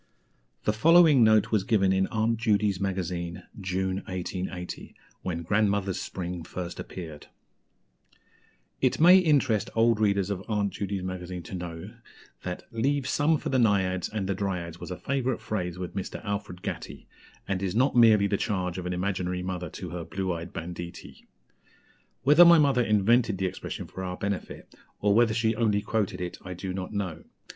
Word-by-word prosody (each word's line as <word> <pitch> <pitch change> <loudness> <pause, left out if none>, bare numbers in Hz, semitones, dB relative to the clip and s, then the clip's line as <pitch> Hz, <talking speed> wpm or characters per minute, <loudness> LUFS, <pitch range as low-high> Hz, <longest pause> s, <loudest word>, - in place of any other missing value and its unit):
'" - - -43
The 105 - +2
following 155 +2 +6
note 110 -1 +4
was 105 -4 +2
given 95 -3 +2
in 95 0 +2
Aunt 115 +1 0
Judy's 105 -4 +1
Magazine, 90 -3 -3 0.2
June 95 0 -1
1880, 90 0 -5 0.3
when 85 -2 -3
"Grandmother's 100 0 +1
Spring" 90 -1 -5
first 90 +1 -6
appeared: 80 -5 -8 1.5
"It - - +2
may 180 +4 +8
interest 135 - +2
old 115 0 +3
readers 100 -2 +1
of 95 -1 -3
Aunt 105 -3 0
Judy's 100 -1 -3
Magazine 90 -1 -5
to 85 - -10
know 90 +3 -6 0.5
that 90 -1 -5
'Leave 130 +4 0
some 150 +3 +2
for - - -5
the 130 - +2
Naïads 95 -5 +1
and 105 -3 -2
the 100 - 0
Dryads' 90 -4 -3
was - - -7
a 90 - -5
favourite 130 -3 -1
phrase 95 -5 -3
with 90 -1 -6
Mr. 95 - -4
Alfred 100 -3 -4
Gatty, - - -6 0.4
and 95 -1 -1
is 95 0 -2
not 130 +4 +2
merely 110 -4 +6
the 100 0 +1
charge 95 -5 -2
of 90 - -5
an 90 - -2
imaginary 90 -1 -2
mother 90 -2 -4
to - - -7
her 85 -1 -5
'blue 95 +2 -3
eyed 85 +1 -6
banditti.' 85 +1 -8 1.0
Whether 150 +5 +8
my 170 0 +8
mother 140 -5 +4
invented 110 0 +3
the 95 - -1
expression 95 +1 -5
for 95 - -8
our 90 -1 -4
benefit, 100 -2 -5 0.3
or 105 0 +3
whether 115 0 +4
she 110 -1 +1
only 105 -3 +1
quoted 105 -3 -1
it, 90 -1 -5
I 90 -1 -6
do 90 +1 -5
not 95 -1 -5
know. 95 -6 -4
100 Hz, 170 wpm, -27 LUFS, 90-110 Hz, 1.5 s, may